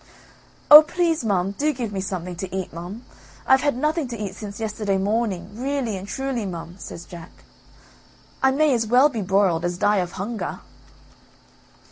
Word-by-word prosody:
"Oh! 300 +1 +13
please 330 -2 0
mum, 195 -3 0
do 290 +10 0
give 235 -5 -4
me 190 - -2
something 180 -2 -4
to 190 +1 -5
eat, 190 -4 -4
mum. 180 +8 -8 0.4
I've 265 0 +5
had 285 -4 0
nothing 305 +1 0
to 240 -1 -6
eat 205 -3 -5
since 200 +1 -8
yesterday 210 -3 -1
morning, 205 -1 -1
really 255 -1 -2
and 190 +1 -7
truly, 265 -1 -3
mum," 170 -2 -7
says 170 - -9
Jack. 170 -2 -11 1.1
"I 265 - +5
may 290 +2 +3
as 230 -2 0
well 255 +6 +5
be 230 -6 -4
broiled, 190 -3 +2
as 175 0 -2
die 205 +2 +2
of 180 -2 -2
hunger." 215 +4 -5
210 Hz, 170 wpm, -23 LUFS, 190-260 Hz, 1.1 s, Oh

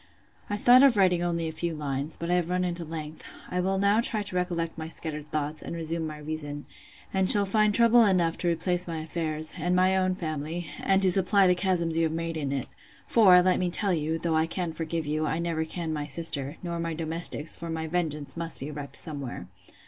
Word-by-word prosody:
'I 205 - -2
thought 245 +4 +6
of 270 -5 +5
writing 180 -3 +3
only 170 -1 -2
a - - -4
few 165 +1 -4
lines; 145 0 -4
but 170 +1 -3
I - - +3
have 175 -1 0
run 180 0 0
into 175 -1 -2
length. 155 -1 -7 0.3
I 180 - -1
will 190 +1 0
now 200 +3 +3
try 215 -3 -1
to 195 -2 -7
recollect 175 -2 -2
my 160 -1 -6
scattered 150 -2 -5
thoughts, 150 0 -3
and - - -7
resume 165 0 -3
my 155 -1 -7
reason; 150 -1 -5 0.5
and 190 -1 +2
shall 205 -1 +10
find 215 +2 +2
trouble 235 +2 +5
enough 180 -5 +2
to 175 - -2
replace 175 +2 0
my 165 -1 -4
affairs, 155 -1 -2
and 175 +3 0
my 185 +1 +3
own 185 -1 +1
family, 160 0 -5
and 195 0 +2
to 185 - +7
supply 195 +2 +4
the 180 - +4
chasms 175 -3 0
you 165 - +2
have 160 - -2
made 165 0 -4
in 145 -3 -3
it: 135 -3 -3 0.4
For, 185 -6 +5
let 185 0 +2
me 180 - 0
tell 195 +2 0
you, 160 0 -1
though 165 -1 -1
I 160 +1 +2
can 170 -1 -3
forgive 165 0 -4
you, 155 +1 -2
I 160 - -1
never 165 -1 -2
can 165 -1 -5
my 150 -1 -4
sister, 145 -1 +1
nor 170 -1 -4
my 165 -1 -3
domestics; 160 -1 -1
for 170 - -8
my 160 0 -3
vengeance 155 -3 -3
must 165 -1 -4
be 140 +3 -6
wreaked 145 -1 -8
somewhere. 140 - -4
165 Hz, 225 wpm, -26 LUFS, 155-180 Hz, 0.5 s, shall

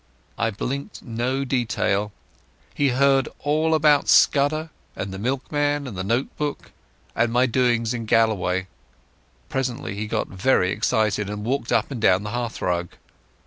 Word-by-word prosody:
I 115 - 0
blinked 135 +6 -5
no 125 +4 -2
detail. 110 -5 0 0.6
He 145 -1 +2
heard 135 +1 +3
all 155 +2 +2
about 150 -2 +3
Scudder, 155 +3 +4 0.2
and 95 0 -5
the 95 - -6
milkman, 145 +4 -1
and 120 -6 -7
the 95 - -3
note 115 +7 -1
book, 150 -1 -4 0.4
and 115 0 +1
my 125 +2 +3
doings 120 -2 +1
in 115 -2 -5
Galloway. 100 -5 +2 0.8
Presently 130 -6 -3
he 105 +2 -4
got - - -1
very 95 -2 +1
excited 105 -1 0
and 105 0 -5
walked 130 0 -1
up - - +1
and 125 -5 -5
down 95 -1 +4
the 105 - -5
hearthrug. 90 -8 -2
120 Hz, 145 wpm, -23 LUFS, 105-140 Hz, 0.8 s, Scudder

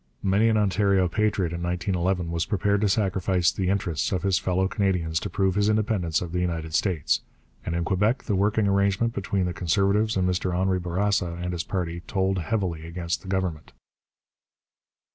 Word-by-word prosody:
Many 100 +4 +3
an 110 - +2
Ontario 100 -2 +2
patriot 100 -2 0
in 85 - -4
1911 90 0 -1
was 85 0 -1
prepared 100 0 +1
to 105 - +2
sacrifice 95 -3 +1
the 95 -2 -2
interests 90 -6 -1
of 95 -2 -1
his 95 -2 +2
fellow 95 +1 0
Canadians 90 -5 0
to - - -5
prove 95 -1 +1
his 105 +2 +2
independence 105 -7 +1
of 85 - -7
the 90 - -1
United 80 -3 -2
States. 85 -4 +1 0.4
And 85 - -3
in 85 0 -1
Quebec 105 +7 +1
the 105 - -2
working 105 +2 +2
arrangement 100 +3 +1
between 95 -2 -1
the 90 - -2
Conservatives 100 +6 +1
and 90 -1 +2
Mr 90 0 -1
Henri 95 0 +1
Bourassa 90 0 0
and 90 0 -3
his 85 -1 -2
party 85 -2 -3
told 95 -1 0
heavily 85 -3 -2
against 85 0 -3
the 95 - -13
Government. 95 -5 -3
95 Hz, 180 wpm, -25 LUFS, 85-100 Hz, 0.4 s, Many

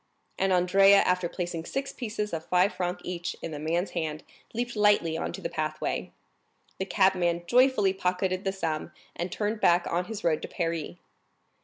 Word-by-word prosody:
And 195 0 +2
Andrea, 195 +2 +6
after 180 -3 +2
placing 175 -2 -4
six 275 0 -3
pieces 210 -4 -4
of 160 -1 -4
five 180 +2 +3
francs 180 -1 -3
each 175 -1 -4
in 165 - -4
the 150 - -5
man's 170 +5 -1
hand, 155 -3 -3 0.3
leaped 240 +1 -3
lightly 205 -6 +3
on - - -2
to - - -7
the - - -2
pathway. - - -3 0.7
The 190 - -1
cabman 185 -3 +2
joyfully 245 -3 +4
pocketed 185 0 -1
the 195 - 0
sum, 165 -4 -3 0.2
and 175 +1 -3
turned 210 +1 -2
back 175 0 +4
on 175 +1 -1
his 215 0 -6
road 160 -2 +2
to - - -5
Paris. 165 -3 -3
180 Hz, 175 wpm, -28 LUFS, 170-200 Hz, 0.7 s, Andrea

